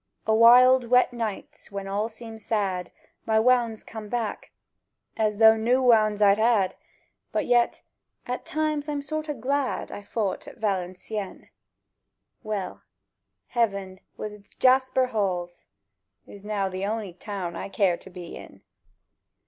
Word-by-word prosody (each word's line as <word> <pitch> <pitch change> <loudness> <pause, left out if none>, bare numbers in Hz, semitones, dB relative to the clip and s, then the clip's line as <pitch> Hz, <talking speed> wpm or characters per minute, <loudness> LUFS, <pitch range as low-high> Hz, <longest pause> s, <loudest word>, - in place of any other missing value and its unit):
O' 220 - +2
wild 250 +3 +7
wet 250 +1 +4
nights, 225 -4 -6
when 200 -1 -5
all 205 +3 -1
seems 225 -1 -10
sad, 190 -5 -1 0.4
My 220 -1 +3
wownds 235 -2 +2
come 220 -2 -8
back, 235 -2 -3 0.7
as 215 -2 0
though 220 0 +7
new 235 +4 +2
wownds 215 -4 +4
I'd 200 +1 +5
had; 215 -5 +3 0.6
But - - -1
yet—at 245 +1 -2
times 305 -1 -2
I'm 290 -1 -2
sort 310 +1 -4
o' 295 - -2
glad 270 +3 -2
I - - -7
fout 205 -1 -3
at - - -11
Valencieën. 195 0 -4 0.9
Well: 205 -3 -4 0.7
Heaven 200 -5 -1 0.2
wi' 215 - -4
its 210 -1 -16
jasper 260 0 +3
halls 185 -7 -3 0.6
Is 200 -1 -13
now 205 -2 -1
the 185 0 -5
on'y 210 -2 -3
Town 180 -2 -5
I 170 - -5
care 195 -3 +2
to - - -14
be 180 -2 -9
in - - -13
220 Hz, 140 wpm, -26 LUFS, 200-245 Hz, 0.9 s, wild